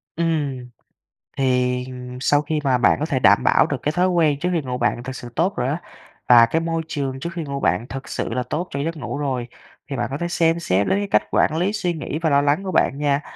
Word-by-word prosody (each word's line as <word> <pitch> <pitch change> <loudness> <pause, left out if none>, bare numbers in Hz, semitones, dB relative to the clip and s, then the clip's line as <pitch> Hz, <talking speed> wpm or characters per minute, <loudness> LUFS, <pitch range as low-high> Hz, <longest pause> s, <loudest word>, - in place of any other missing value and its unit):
Ừm. 145 -7 -1 0.7
Thì, 125 -1 +1
ừm, 125 0 -8
sau 145 +1 +3
khi 150 +1 -2
mà 130 -3 +3
bạn 120 -4 +3
có 150 - 0
thể 140 -5 -1
đảm - - +5
bảo - - +4
được - - -2
cái 150 - 0
thói 180 +3 +2
quen 160 -5 +2
trước 180 +4 -1
khi 170 - +1
ngủ 125 -2 -4
bạn 120 0 0
thực 130 +1 -6
sự 120 - -8
tốt 180 +5 +1
rồi 125 - -1
á, 150 +6 -2 0.5
và 120 -1 +8
cái 160 +8 0
môi 165 0 -1
trường 135 -4 -3
trước 170 +5 -4
khi 170 -2 -4
ngủ 140 -1 -4
bạn 120 -2 0
thực 135 0 -7
sự - - -3
là 125 +1 -1
tốt 175 +4 -2
cho 140 - -3
giấc 165 +4 -2
ngủ 145 - -5
rồi 130 -4 -2 0.4
thì 140 - -3
bạn 120 -2 -1
có 135 - -2
thể 170 - -2
xem 170 -1 +1
xét 100 - +1
đến 195 - +2
cái 205 - -2
cách - - +4
quản 155 - +2
lý 185 +5 0
suy 180 -5 -1
nghĩ 155 -1 -4
và 165 - +2
lo 140 -1 +4
lắng 145 +6 +1
của 190 - -3
bạn 140 -5 +2
nha. 145 -1 +1
145 Hz, 265 wpm, -22 LUFS, 125-165 Hz, 0.7 s, và